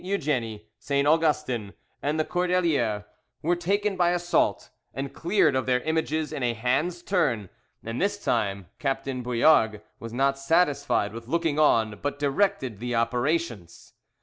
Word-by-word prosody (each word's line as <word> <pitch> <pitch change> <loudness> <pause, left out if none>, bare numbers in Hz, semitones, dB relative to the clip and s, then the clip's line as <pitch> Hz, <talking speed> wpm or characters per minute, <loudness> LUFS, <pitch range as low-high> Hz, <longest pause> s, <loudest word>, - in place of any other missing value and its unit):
Eugenie, 130 - -2
St. 140 0 0
Augustin, 150 -9 +1 0.3
and 150 +2 -1
the 155 - +1
Cordeliers 170 - +1 0.4
were 175 +3 +2
taken 200 +4 0
by 175 -1 +3
assault, 175 0 0 0.2
and 135 0 -4
cleared 175 -5 +2
of 130 - -1
their 125 -1 +2
images 160 +1 -1
in - - -4
a 120 -1 0
hand's 150 +10 -1
turn; 130 - 0 0.3
and 115 +2 -4
this 205 +1 -1
time 100 -5 0
Captain 135 -1 -2
Bouillargues 120 -3 +3 0.2
was 115 - -7
not 135 +3 +1
satisfied 145 -8 +1
with 115 0 -8
looking 160 0 0
on, 110 -8 +3
but 145 0 -2
directed 145 - 0
the 120 +1 -3
operations. 120 - -2
140 Hz, 145 wpm, -26 LUFS, 115-170 Hz, 0.4 s, by